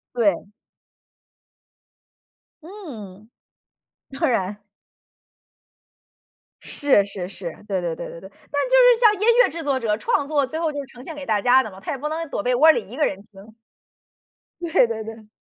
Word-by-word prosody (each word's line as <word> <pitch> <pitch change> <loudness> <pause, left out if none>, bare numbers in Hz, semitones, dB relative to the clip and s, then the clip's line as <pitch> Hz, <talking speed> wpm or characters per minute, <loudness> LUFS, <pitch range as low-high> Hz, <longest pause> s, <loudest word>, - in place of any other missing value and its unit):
对。 200 -6 +1 2.2
嗯。 225 - -11 0.8
当 270 - -1
然。 205 -3 -2 2.0
是 275 -8 +2
是 190 -3 -6
是， 185 -3 -7 0.2
对 190 -4 -1
对 170 -2 -3
对 - - -7
对 - - -10
对。 190 - -11 0.2
那 285 +10 0
就 - - -14
是 - - +6
像 445 -4 +6
音 440 - +2 0.2
乐 - - +2
制 335 0 -7
作 275 -3 0
者， 215 -3 0
创 280 +6 0
作 290 -2 +1
最 315 +5 -5
后 325 -2 0
就 285 -1 -5
呈 255 -1 -14
现 320 - -8
给 290 - -8
大 215 -4 +1
家 250 +4 +5
的 220 - -6
嘛， 190 - -13
他 215 - -5
也 280 - -3
不 300 +3 -4
能 325 +1 -4
躲 - - -3
被 250 +3 +1
窝 315 +5 +7
里 210 -10 -3
一 240 - -9
个 300 +1 +2
人 195 0 -3
听。 210 +1 -16 1.1
对 335 -7 +3
对 220 -1 -4
对。 220 -1 -10
245 Hz, 185 characters per minute, -22 LUFS, 205-300 Hz, 2.2 s, 窝